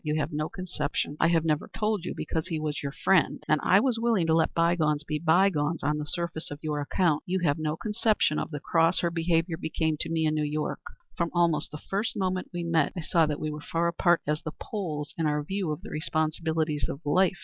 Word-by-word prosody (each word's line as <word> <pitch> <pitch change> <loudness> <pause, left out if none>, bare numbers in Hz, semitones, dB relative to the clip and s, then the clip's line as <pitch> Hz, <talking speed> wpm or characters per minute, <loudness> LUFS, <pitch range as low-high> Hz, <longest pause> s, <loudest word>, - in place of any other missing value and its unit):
You 150 -1 -1
have 150 +1 -2
no 155 +1 -1
conception 155 -6 -3
I 160 - +4
have 165 -1 +2
never 155 -2 0
told 210 -4 -1
you, - - -4
because 160 -1 -2
he 160 - -2
was 155 -1 -3
your 140 - -3
friend, 185 +4 +2
and 155 -1 +3
I 190 - +6
was 240 0 +2
willing 225 -7 +2
to 160 - +2
let 160 0 +3
bygones 160 -3 +2
be 150 0 -2
bygones 165 -2 +2
on 150 +1 +1
the 150 - -4
surface 170 -2 -3
on 145 - -6
your 150 -2 -1
account 155 +1 +1
you 185 0 0
have 145 -1 +2
no 155 0 -1
conception 210 -7 +1
of - - -3
the 150 -2 -5
cross 165 +3 +2
her 170 - 0
behavior 165 0 +1
became 160 -2 -1
to - - -2
me 160 -1 +1
in 155 - +2
New 155 -1 0
York. 150 +1 -2 0.3
From 170 -1 0
almost 170 -4 +2
the 150 - -7
first 205 +7 -3
moment 185 -1 -1
we 175 -1 -3
met 165 -3 +1
I - - -2
saw 165 0 +2
that 150 -1 -2
we 155 - -2
were 150 0 -6
far 165 +2 0
apart 170 0 +2
as 150 +1 -1
the 155 - -6
poles 155 -8 -4
in 160 - +2
our 150 0 0
views 190 +2 -2
of 150 +5 -5
the - - -8
responsibilities 155 -1 -1
of 140 - -5
life. 185 +5 +3
160 Hz, 235 wpm, -27 LUFS, 150-175 Hz, 0.3 s, I